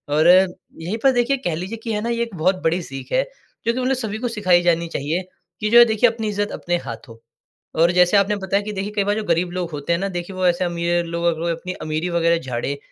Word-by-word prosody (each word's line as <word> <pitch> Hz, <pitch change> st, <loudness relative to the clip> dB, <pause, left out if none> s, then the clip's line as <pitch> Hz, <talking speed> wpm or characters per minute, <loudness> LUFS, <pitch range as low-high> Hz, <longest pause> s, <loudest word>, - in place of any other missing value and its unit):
और 155 Hz, +2 st, +4 dB
यही 180 Hz, +1 st, +2 dB
पर 270 Hz, -, +6 dB
देखिए 245 Hz, +3 st, +2 dB
कह 170 Hz, -3 st, 0 dB
लीजिए 190 Hz, +7 st, -5 dB
कि 225 Hz, -2 st, -2 dB
है 210 Hz, -, -1 dB
ना 235 Hz, -, -2 dB
ये 235 Hz, 0 st, -1 dB
एक 230 Hz, -5 st, -7 dB
बहुत 185 Hz, +4 st, +2 dB
बड़ी 165 Hz, +2 st, +1 dB
सीख 135 Hz, -2 st, -9 dB
है -, -, +3 dB, 0.4 s
क्योंकि 235 Hz, +2 st, 0 dB
उन्हें 260 Hz, +1 st, +1 dB
सभी 220 Hz, -4 st, -4 dB
को 245 Hz, -, -2 dB
सिखाई 180 Hz, -3 st, +4 dB
जानी 170 Hz, -1 st, +2 dB
चाहिए 165 Hz, +4 st, -2 dB, 0.4 s
कि 215 Hz, -, -1 dB
जो 235 Hz, +1 st, +7 dB
है 240 Hz, -, +9 dB
देखिए 225 Hz, +2 st, +3 dB
अपनी 225 Hz, -1 st, -4 dB
इज़्ज़त 205 Hz, 0 st, -2 dB
अपने 175 Hz, 0 st, -2 dB
हाथों। 115 Hz, 0 st, -8 dB, 0.6 s
और 170 Hz, +1 st, +5 dB
जैसे 180 Hz, +3 st, +4 dB
आपने 200 Hz, +1 st, +2 dB
बताया 195 Hz, +1 st, 0 dB
कि 210 Hz, -, -5 dB
देखिए 200 Hz, +2 st, -4 dB
कई 200 Hz, -, +2 dB
बार 205 Hz, +1 st, 0 dB
जो 220 Hz, -, -2 dB
गरीब 170 Hz, +1 st, +1 dB
लोग 175 Hz, -2 st, -3 dB
होते 150 Hz, +3 st, -2 dB
हैं 170 Hz, -, 0 dB
ना 195 Hz, -, -1 dB
देखिए 175 Hz, +1 st, -5 dB
वो 185 Hz, 0 st, -1 dB
ऐसे 175 Hz, +1 st, +2 dB
अमीर 170 Hz, 0 st, 0 dB
लोग 170 Hz, 0 st, -3 dB
अगर 170 Hz, 0 st, 0 dB
अपनी 175 Hz, +2 st, -5 dB
अमीरी 155 Hz, +3 st, -2 dB
वग़ैरह 170 Hz, 0 st, +2 dB
झाड़े 130 Hz, 0 st, -3 dB
180 Hz, 250 wpm, -21 LUFS, 170-210 Hz, 0.6 s, है